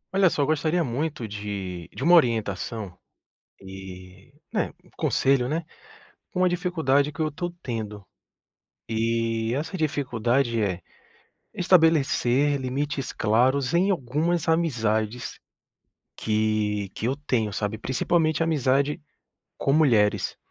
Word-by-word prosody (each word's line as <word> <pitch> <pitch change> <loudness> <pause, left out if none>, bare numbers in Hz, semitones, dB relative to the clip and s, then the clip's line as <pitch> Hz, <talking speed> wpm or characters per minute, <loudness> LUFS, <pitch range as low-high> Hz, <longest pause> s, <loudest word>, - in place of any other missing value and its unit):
Olha 195 -2 +5
só, 145 - 0
eu - - +2
gostaria 155 +3 +1
muito 135 -1 -3
de 100 -4 -5
de - - -6
uma 175 - +5
orientação 110 - +1 0.6
e, 95 -1 -11 0.2
né, - - 0
um - - -22
conselho, 130 -2 +2
né, 160 +2 -2 0.7
com 185 -3 0
a - - +5
dificuldade 160 -6 +1
que 145 - -9
eu 155 - +2
estou 175 +3 -4
tendo. 105 -4 -5 0.8
E 115 0 0
essa 155 +8 -3
dificuldade 125 -6 0
é: 95 -3 -1 0.7
estabelecer 145 -6 +3
limites 135 +2 -3
claros 125 +6 +2
em 190 +4 +3
algumas 160 +2 0
amizades 120 -8 0 0.8
que 105 -2 0
que - - -4
eu 130 +3 0
tenho, 125 -8 -1
sabe, 105 +2 -2
principalmente 155 +8 +1
amizade 140 -2 +1 0.6
com 135 - +1
mulheres. 105 - +3
130 Hz, 115 wpm, -25 LUFS, 110-155 Hz, 0.8 s, Olha